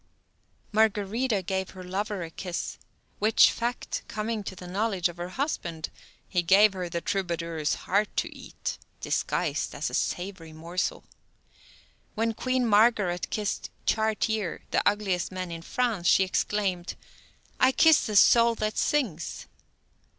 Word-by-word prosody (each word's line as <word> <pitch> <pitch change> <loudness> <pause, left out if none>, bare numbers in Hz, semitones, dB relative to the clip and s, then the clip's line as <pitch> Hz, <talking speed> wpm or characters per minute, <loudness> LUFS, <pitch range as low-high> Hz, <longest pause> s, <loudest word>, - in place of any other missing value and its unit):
Margarida 215 +1 +1
gave 190 0 -2
her 185 -1 -10
lover 195 +1 -3
a 165 - -7
kiss, 180 0 -5 0.4
which 215 +2 +6
fact 240 +1 -3
coming 215 0 -3
to 190 - -5
the 180 - -10
knowledge 190 0 0
of 175 - -10
her 175 +1 -5
husband, 175 - -3 0.4
he 180 - +1
gave 195 +4 +6
her 180 -2 -4
the 170 0 -3
troubadour's 170 -5 -1
heart 205 +3 +2
to - - -1
eat, - - -6 0.2
disguised - - -1
as - - -2
a - - -12
savory 175 -3 -3
morsel. 170 +3 -3 1.1
When 225 +1 0
Queen 255 +2 0
Margaret 205 -5 +3
kissed 210 -2 -2 0.2
Chartier, 220 -3 0
the - - +3
ugliest 195 -4 -1
man 185 -1 -5
in 165 0 -6
France, 220 -2 -1
she 195 - +6
exclaimed: 190 -1 -1 0.6
"I 255 - +5
kiss 320 +3 +5
the 215 - -3
soul 235 +3 +6
that 215 -1 -2
sings." 220 - -1
195 Hz, 135 wpm, -27 LUFS, 175-220 Hz, 1.1 s, which